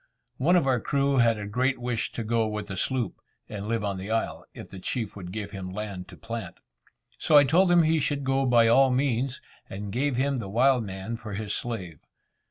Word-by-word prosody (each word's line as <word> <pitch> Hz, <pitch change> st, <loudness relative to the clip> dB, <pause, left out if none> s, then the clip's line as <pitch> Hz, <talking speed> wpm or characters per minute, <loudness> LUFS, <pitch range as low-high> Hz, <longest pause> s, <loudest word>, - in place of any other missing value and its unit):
One 165 Hz, +7 st, +3 dB
of 175 Hz, -, +3 dB
our 130 Hz, -2 st, +2 dB
crew 140 Hz, +2 st, +1 dB
had 115 Hz, -2 st, +4 dB
a 105 Hz, -, -5 dB
great 130 Hz, +6 st, 0 dB
wish 120 Hz, -1 st, -2 dB
to 115 Hz, -, -3 dB
go 115 Hz, 0 st, +1 dB
with 105 Hz, -1 st, -4 dB
the 95 Hz, -, -4 dB
sloop, 120 Hz, +2 st, -2 dB, 0.3 s
and 105 Hz, -1 st, -6 dB
live 115 Hz, -1 st, -1 dB
on 100 Hz, -2 st, -2 dB
the 95 Hz, +3 st, -6 dB
isle, 115 Hz, 0 st, -2 dB
if -, -, -10 dB
the 95 Hz, -, -8 dB
chief 110 Hz, +2 st, -3 dB
would 90 Hz, -3 st, -8 dB
give 105 Hz, 0 st, -5 dB
him 95 Hz, -2 st, -6 dB
land 95 Hz, -1 st, -6 dB
to 95 Hz, -3 st, -13 dB
plant. 115 Hz, +1 st, -6 dB, 0.6 s
So 150 Hz, -, +5 dB
I 145 Hz, -, +8 dB
told 175 Hz, +6 st, +4 dB
him 175 Hz, -1 st, +6 dB
he 160 Hz, 0 st, +3 dB
should 140 Hz, 0 st, -1 dB
go 135 Hz, 0 st, +1 dB
by 120 Hz, -2 st, +5 dB
all 135 Hz, +4 st, +5 dB
means, 130 Hz, 0 st, 0 dB, 0.3 s
and 100 Hz, +1 st, -6 dB
gave 135 Hz, +4 st, 0 dB
him 135 Hz, +2 st, +1 dB
the 115 Hz, -5 st, -5 dB
wild 125 Hz, +3 st, +3 dB
man 95 Hz, +3 st, -5 dB
for 110 Hz, -3 st, -7 dB
his 105 Hz, 0 st, -3 dB
slave. 95 Hz, -10 st, -5 dB
115 Hz, 220 wpm, -27 LUFS, 105-135 Hz, 0.6 s, I